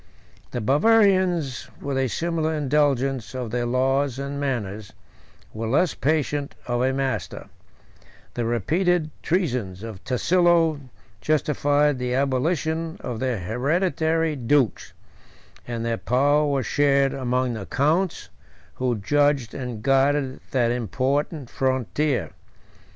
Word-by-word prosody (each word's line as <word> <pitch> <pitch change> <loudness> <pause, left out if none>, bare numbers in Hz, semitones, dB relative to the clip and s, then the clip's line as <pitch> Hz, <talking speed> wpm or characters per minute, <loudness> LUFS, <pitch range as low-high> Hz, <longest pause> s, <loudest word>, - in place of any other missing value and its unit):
The 120 - -4
Bavarians, 180 - +3
with 140 -1 -3
a 135 0 +1
similar 160 +3 -1
indulgence 135 -4 0
of 125 -4 -4
their 120 0 -1
laws 130 +1 +1
and 140 +1 -4
manners, 110 -7 -3 0.6
were 110 +1 -4
less 150 +7 +2
patient 145 -4 -1
of 120 0 -1
a 130 +1 +2
master: 135 0 -3 0.8
the 120 - -2
repeated 155 - +1
treasons 125 - -1
of 110 -5 -8
Tasillo 165 +4 +2 0.4
justified 145 -2 +1
the 125 0 -1
abolition 160 +4 0
of 120 -3 -5
their 130 -3 -1
hereditary 160 - 0
dukes; 125 - 0 0.7
and 115 -1 -3
their 115 -1 -1
power 145 +4 +2
was 135 -3 0
shared 140 +1 +2
among 125 -1 -1
the 110 -4 -6
counts, 160 +7 0 0.5
who 125 -2 0
judged 145 +2 +1
and 125 -5 -6
guarded 135 0 +2
that 120 -3 +1
important 135 +4 -1
frontier. 130 - -1
135 Hz, 115 wpm, -24 LUFS, 125-150 Hz, 0.8 s, Bavarians